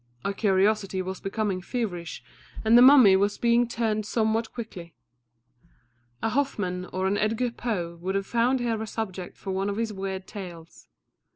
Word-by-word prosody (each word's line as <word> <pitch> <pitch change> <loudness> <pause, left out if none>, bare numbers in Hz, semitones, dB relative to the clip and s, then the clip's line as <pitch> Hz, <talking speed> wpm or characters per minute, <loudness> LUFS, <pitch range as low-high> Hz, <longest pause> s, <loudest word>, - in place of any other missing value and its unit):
Our 200 - 0
curiosity 195 -1 +1
was 190 0 -5
becoming 195 -2 -2
feverish, 180 -6 -4 0.4
and 220 +2 +5
the 240 - +9
mummy 255 -7 +8
was 200 +2 +1
being 235 0 +3
turned 225 -2 -1
somewhat 225 0 0
quickly. 180 -9 -8 1.3
A - - +2
Hoffmann 205 -9 -1
or 185 0 -3
an 200 +2 +1
Edgar 225 +3 0
Poe 180 -9 -4
could 190 +2 -2
have 195 0 -1
found 240 +3 +1
here 230 -2 -1
a 220 - -4
subject 190 -5 -5
for 195 - -6
one 195 +1 -1
of 200 - -3
his 225 -1 -2
weird 190 -1 -5
tales. 175 -5 -10
205 Hz, 165 wpm, -26 LUFS, 190-230 Hz, 1.3 s, the